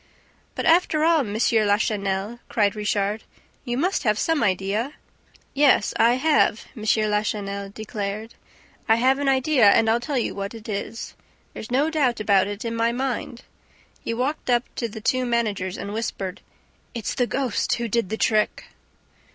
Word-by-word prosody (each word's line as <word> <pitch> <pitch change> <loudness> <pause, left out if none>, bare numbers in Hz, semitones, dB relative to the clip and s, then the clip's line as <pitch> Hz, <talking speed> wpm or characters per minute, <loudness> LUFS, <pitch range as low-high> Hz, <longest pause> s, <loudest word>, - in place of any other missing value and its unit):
"But, - - -3
after 325 -2 +3
all, 330 0 +4
M. 210 -7 -3
Lachenel," 210 -1 +1
cried 205 -2 +1
Richard, 210 0 -1 0.4
"you 240 -1 -3
must 365 +7 0
have 210 -6 +1
some 325 +2 +1
idea." 205 +6 0 0.6
"Yes, 275 -7 +3
I 235 +1 +4
have," 285 -5 +2
M. 220 - -9 0.3
Lachenel 205 -1 -2
declared. 215 +1 -5 0.6
"I 225 - +6
have 260 +4 +2
an 285 -1 +1
idea 260 -4 +4
and 220 +2 +4
I'll 225 +1 +3
tell 265 +3 -3
you 240 - -1
what 200 +3 -5
it 225 0 -11
is. 215 +2 -5 0.4
There's 220 - -8
no 280 +6 +1
doubt 270 -7 +1
about 200 -3 +3
it 205 +2 -6
in 230 0 -2
my 230 0 +1
mind." 250 -1 -3 0.6
He - - -3
walked 260 +4 -2
up 240 -1 +3
to 235 - -2
the 220 +1 -9
two 255 +3 +1
managers 215 -6 -1
and 200 +1 -6
whispered. 200 -4 -4 0.5
"It's 230 -3 -3
the 245 - 0
ghost 260 -4 0
who 235 0 -3
did 230 -3 0
the 220 - -3
trick!" 215 -2 0
225 Hz, 165 wpm, -23 LUFS, 205-255 Hz, 0.6 s, I